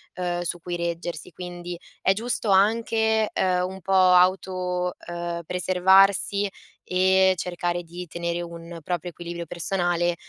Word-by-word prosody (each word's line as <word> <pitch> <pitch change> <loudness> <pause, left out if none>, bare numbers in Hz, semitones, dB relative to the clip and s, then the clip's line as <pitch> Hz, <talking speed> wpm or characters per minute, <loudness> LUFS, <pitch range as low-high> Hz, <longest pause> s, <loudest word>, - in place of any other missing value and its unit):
uhm, 175 -1 -2
su 175 0 -3
cui 175 +1 -5
reggersi. 170 0 -4
Quindi 175 -1 -7 0.2
è 190 - +4
giusto 225 0 -2
anche, 220 +2 +3
ehm, 180 -1 +1
un 190 - -8
po' 195 +3 -2
auto, 180 -1 +3
ehm, 175 0 -4
preservarsi 190 +3 +3 0.4
e 190 +1 +4
cercare 175 0 -2
di 175 +2 -8
tenere 170 +1 -3
un 170 0 -8
proprio 175 0 -3
equilibrio 170 0 -7
personale 175 0 0
180 Hz, 130 wpm, -25 LUFS, 175-190 Hz, 0.4 s, è